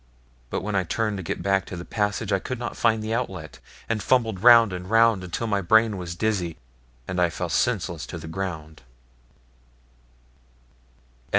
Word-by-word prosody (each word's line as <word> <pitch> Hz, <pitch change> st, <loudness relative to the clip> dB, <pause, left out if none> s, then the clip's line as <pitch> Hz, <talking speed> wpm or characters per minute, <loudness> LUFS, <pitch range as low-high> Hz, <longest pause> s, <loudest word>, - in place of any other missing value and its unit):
But -, -, -2 dB
when 105 Hz, +1 st, -3 dB
I 95 Hz, -2 st, +2 dB
turned 105 Hz, +3 st, -1 dB
to 95 Hz, -, -5 dB
get -, -, -4 dB
back 95 Hz, -1 st, +2 dB
to 90 Hz, -, -6 dB
the 85 Hz, -, -7 dB
passage, 105 Hz, -1 st, -1 dB
I 95 Hz, -, +2 dB
could 130 Hz, +6 st, -5 dB
not 120 Hz, 0 st, -5 dB
find 110 Hz, -2 st, +1 dB
the 110 Hz, +1 st, -2 dB
outlet, 95 Hz, -10 st, -4 dB, 0.3 s
and 115 Hz, -2 st, -1 dB
fumbled 115 Hz, -7 st, +1 dB
round 115 Hz, -3 st, +7 dB
and 90 Hz, 0 st, -6 dB
round 115 Hz, -3 st, +4 dB
until 90 Hz, +6 st, -4 dB
my 100 Hz, -3 st, 0 dB
brain 110 Hz, +3 st, +4 dB
was 90 Hz, -2 st, -5 dB
dizzy, 90 Hz, -4 st, -1 dB, 0.5 s
and 90 Hz, -1 st, -1 dB
I 90 Hz, -, +3 dB
fell -, -, -4 dB
senseless -, -, -1 dB
to -, -, -6 dB
the -, -, -9 dB
ground. 80 Hz, -3 st, -5 dB
100 Hz, 175 wpm, -24 LUFS, 90-110 Hz, 0.5 s, round